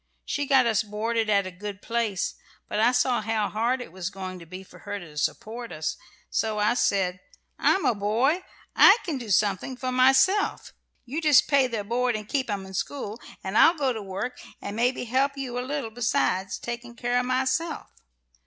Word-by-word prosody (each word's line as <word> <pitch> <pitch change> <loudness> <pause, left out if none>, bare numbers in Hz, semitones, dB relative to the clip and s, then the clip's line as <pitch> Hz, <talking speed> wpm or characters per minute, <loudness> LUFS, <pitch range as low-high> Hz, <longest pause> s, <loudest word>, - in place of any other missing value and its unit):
She 285 -1 -2
got 265 -2 +5
us 220 -4 +2
boarded 220 +1 -1
at 200 -2 +3
a 185 - -5
good 200 +2 -7
place, 230 -4 -1 0.3
but 210 - -2
I 230 +3 +5
saw 245 -1 +2
how 215 -1 -1
hard 240 +4 0
it 245 - -9
was 185 0 -4
going 185 -1 -7
to 170 - -13
be 185 +3 -8
for - - -16
her 205 0 -5
to 170 -6 -11
support 230 +10 -3
us, 155 0 -3 0.4
so 220 -1 0
I 210 +2 +3
said, 190 -6 +1 0.4
'I'm 385 - +3
a - - +4
boy; 230 - +1 0.3
I 400 - +8
can 310 -7 -2
do 235 -3 -8
something 205 +6 +1
for 255 +1 -3
myself. 265 +11 +3 0.3
You 285 +7 -3
just 300 -4 +5
pay 280 -3 +4
their 225 -4 -3
board, 240 +3 0
and 215 -1 -5
keep 265 -1 -1
'em 200 -2 -3
to 190 - -11
school, 230 +1 -4 0.2
and 190 +2 -4
I'll 330 +8 +6
go 270 -4 +1
to 220 - -5
work, 200 +6 -5 0.2
and 200 - -6
maybe 245 +3 +1
help 270 +4 +1
you 250 -3 -3
a - - -1
little, 260 -3 -3
besides 225 -5 0
taking 240 0 -6
care 245 +1 0
of 250 - -2
myself.'" 260 +6 -1
235 Hz, 200 wpm, -26 LUFS, 205-255 Hz, 0.4 s, I